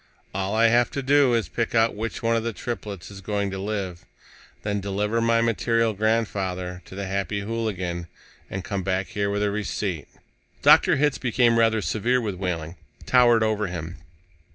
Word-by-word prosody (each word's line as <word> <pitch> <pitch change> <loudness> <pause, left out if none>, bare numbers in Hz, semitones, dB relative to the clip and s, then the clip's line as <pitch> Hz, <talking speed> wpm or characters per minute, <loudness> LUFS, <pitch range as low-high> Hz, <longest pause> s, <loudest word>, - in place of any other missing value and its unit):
"All 95 +2 -2
I 115 +1 +5
have 120 +1 +3
to 140 - -1
do 140 -2 +4
is 115 - 0
pick 115 0 -2
out 115 0 +4
which 115 +3 -5
one 115 0 +2
of 115 - +1
the 115 -1 -2
triplets 105 -6 -6
is 100 -1 -10
going 100 0 -2
to 95 - -4
live, 95 -4 -4 0.6
then 105 -1 -1
deliver 105 +3 -1
my 115 0 +3
maternal 115 0 +1
grandfather 95 -4 -1
to - - -11
the 100 0 -4
Happy 100 +1 -2
Hooligan, 95 -6 -3 0.4
and 95 0 -4
come 100 0 -3
back 95 0 -1
here 100 -1 -1
with 105 +1 0
a 105 - +1
receipt." 100 -6 -3 0.6
Dr. - - +6
Hitz 145 -1 +1
became 120 -2 +3
rather 110 -2 +3
severe 120 +4 +1
with 110 -4 -2
Wehling, 85 -2 -3 0.3
towered 120 -3 +5
over 110 -1 0
him. 85 0 -6
105 Hz, 175 wpm, -24 LUFS, 95-115 Hz, 0.6 s, Dr